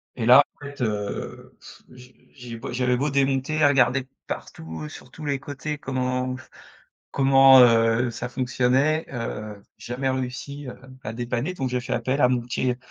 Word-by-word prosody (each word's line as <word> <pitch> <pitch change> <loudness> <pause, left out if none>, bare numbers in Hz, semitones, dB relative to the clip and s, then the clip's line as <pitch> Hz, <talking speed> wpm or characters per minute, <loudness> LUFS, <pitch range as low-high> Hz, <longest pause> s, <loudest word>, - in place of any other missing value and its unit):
et 115 - -3
là, 125 +4 +8 0.2
en - - -9
fait, 140 -2 -9
heu, 105 -3 -4
pff, - - -14
j'ai 125 0 -16 0.2
j'ai 120 -3 -8
beau 125 +3 -7
j'avais 125 0 +1
beau 145 +3 0
démonter, 140 +2 +1
regarder 135 -1 +4
de 130 - -15 0.2
partout, 80 -1 -7
sur - - -12
tous 155 - -9
les 140 -2 -1
côtés 145 +2 -5
comment 130 -1 -2 0.8
comment, 135 -1 +6
heu, 115 0 +4
ça 120 +2 -5
fonctionnait? 130 +5 +1
Heu 110 -4 -5 0.2
jamais 130 +2 -3
réussi, 130 +2 -5
heu, - - -8 0.3
à 110 - -5
dépanner. 120 +8 -3
Donc 130 -6 -3
j'ai 125 0 -1
fait 125 - -6
appel 135 +3 -1
à 125 - +5
mon 125 -1 +1
petit, 125 +1 -1
m 125 - -2
125 Hz, 175 wpm, -24 LUFS, 120-135 Hz, 0.8 s, là